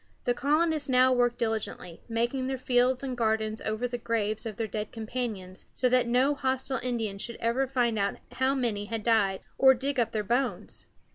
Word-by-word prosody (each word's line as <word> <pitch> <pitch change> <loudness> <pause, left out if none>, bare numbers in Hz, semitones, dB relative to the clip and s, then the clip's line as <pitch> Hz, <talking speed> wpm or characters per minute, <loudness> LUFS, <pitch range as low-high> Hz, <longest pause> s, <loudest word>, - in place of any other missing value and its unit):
The 245 - +2
colonists 300 +3 +1
now 255 0 +5
worked 245 -1 +2
diligently, 220 -7 -3
making 240 +3 -1
their 265 0 -2
fields 255 0 +2
and 260 -2 -3
gardens 220 -1 0
over 215 +3 -1
the 245 0 -5
graves 220 -1 -1
of 215 - -6
their 225 - -1
dead 210 0 -4
companions, 220 -5 -5
so 255 - +2
that 250 -1 +3
no 255 +4 +3
hostile 265 -1 -1
Indians 225 -5 -2
should 235 - -5
ever 240 +4 +1
find 240 -4 +1
out 200 0 0
how 260 +1 +1
many 225 -6 -1
had 225 0 -4
died, 210 -4 +2 0.2
or 265 0 +7
dig 270 +2 -1
up 230 -1 +1
their 215 -2 -1
bones. 240 -2 -2
240 Hz, 190 wpm, -28 LUFS, 220-260 Hz, 0.2 s, or